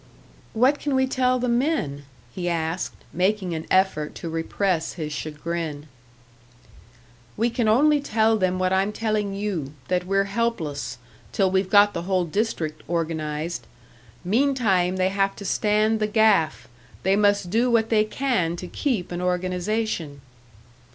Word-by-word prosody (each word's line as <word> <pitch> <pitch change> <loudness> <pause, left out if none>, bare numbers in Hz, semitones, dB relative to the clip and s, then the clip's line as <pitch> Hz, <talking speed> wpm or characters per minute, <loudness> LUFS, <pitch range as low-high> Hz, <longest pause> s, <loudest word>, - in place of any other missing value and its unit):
"What 260 +6 +3
can 285 -2 -1
we 265 0 +3
tell 255 -1 +1
the 250 0 -1
men?" 235 - 0 0.3
he 175 -1 -2
asked, 165 +1 -2 0.2
making 185 0 0
an 160 0 -5
effort 185 -6 +1
to 165 - -6
repress 165 +1 -1
his 155 -3 -5
chagrin. 155 0 -4 1.5
"We 235 +1 +1
can 235 -1 0
only 290 +7 +4
tell 225 -4 +2
them 185 -3 +1
what 185 0 +1
I'm 195 +2 +2
telling 210 -2 -1
you 185 -9 -3 0.2
that 180 0 0
we're 195 +1 +2
helpless, 195 - -2 0.3
till 195 -3 +1
we've 190 0 +1
got 205 +1 +6
the 170 - -3
whole 185 -2 +2
district 165 -4 -2
organised. 160 -1 -3 0.6
Meantime, 205 -5 +2
they 185 0 +2
have 195 0 0
to 200 - -9
stand 215 +3 +2
the 215 - +1
gaff; 210 -6 +2 0.4
they 190 +1 +3
must 205 -3 +2
do 235 +4 +2
what 230 -1 +2
they 215 -2 +4
can 215 -7 -1
to 180 - -7
keep 210 -2 -2
an 175 0 -3
organisation." 180 -3 -2
195 Hz, 145 wpm, -24 LUFS, 170-220 Hz, 1.5 s, got